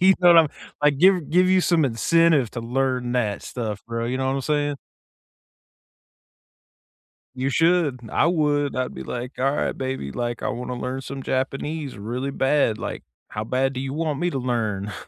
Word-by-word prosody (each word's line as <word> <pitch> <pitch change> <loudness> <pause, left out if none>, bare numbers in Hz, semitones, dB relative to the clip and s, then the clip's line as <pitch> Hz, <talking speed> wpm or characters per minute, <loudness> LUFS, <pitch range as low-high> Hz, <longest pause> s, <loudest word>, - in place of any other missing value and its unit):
You 190 +1 +6
know 175 - +6
what 170 -1 +8
I'm 160 -3 +5 0.3
like, 145 -2 +3
give 180 -3 +4
give 180 +2 +4
you 185 0 +4
some 170 -4 +3
incentive 145 +2 +3
to 120 - -4
learn 125 0 -1
that 110 -5 -1
stuff, 110 -4 -5
bro, 115 0 -3
you 125 +2 -1
know 130 - -1
what 135 - 0
I'm - - -1
saying? 145 0 0 2.6
You 130 +2 -1
should, 165 -4 +2
I 160 - +3
would, 145 -4 +1
I'd 130 0 -2
be 65 - -7
like, 125 - -6
"All 135 +2 +2
right, - - -1
baby, 130 - -4
like, 120 - -3
I - - 0
wanna 125 +1 -4
learn 130 +2 -4
some 135 0 -7
Japanese 135 +1 -3
really 120 +6 -3
bad. 135 -5 +2
Like, - - -5 0.3
how 105 - -4
bad 130 +4 0
do 130 - -4
you 135 0 -3
want 155 -2 -2
me 175 - +1
to 140 - -3
learn?" 110 -5 -2
135 Hz, 185 wpm, -23 LUFS, 120-150 Hz, 2.6 s, what